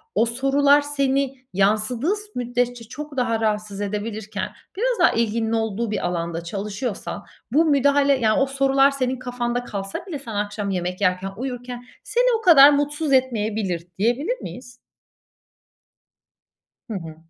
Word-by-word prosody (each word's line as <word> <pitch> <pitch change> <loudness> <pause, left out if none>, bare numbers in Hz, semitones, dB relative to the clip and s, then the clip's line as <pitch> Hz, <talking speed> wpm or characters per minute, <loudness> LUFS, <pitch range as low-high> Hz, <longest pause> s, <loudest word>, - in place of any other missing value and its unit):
o 230 - +4
sorular 275 +4 +3
seni 275 -2 0 0.2
yansıdığı 215 - +1
s 415 - -7
müddetçe 245 -1 -1
çok 295 +4 -9
daha 230 -3 +1
rahatsız 210 -2 -2
edebilirken, 210 +1 -4 0.3
biraz 485 -1 0
daha 340 - +5
ilginin 225 0 0
olduğu 225 0 -1
bir 215 - -2
alanda 170 -1 -3
çalışıyorsan, 205 +5 -5 0.3
bu 315 +6 +4
müdahale, 285 -1 +4
yani, 215 -2 +2
o - - +4
sorular 275 0 +3
senin 260 -2 -2
kafanda 245 -1 -2
kalsa 195 - -5
bile 320 -7 -5
sen 230 -6 -8
akşam 205 0 -2
yemek 180 0 -3
yerken, 185 0 +1
uyurken 245 -1 -5 0.2
seni - - +2
o - - -11
kadar 300 -8 +9
mutsuz 290 +1 0
etmeyebilir, 215 -9 0
diyebilir 270 - +1
miyiz? 245 -1 -9 2.2
Hı 220 - -3
hı. 165 -5 -6
245 Hz, 140 wpm, -22 LUFS, 210-275 Hz, 2.2 s, kadar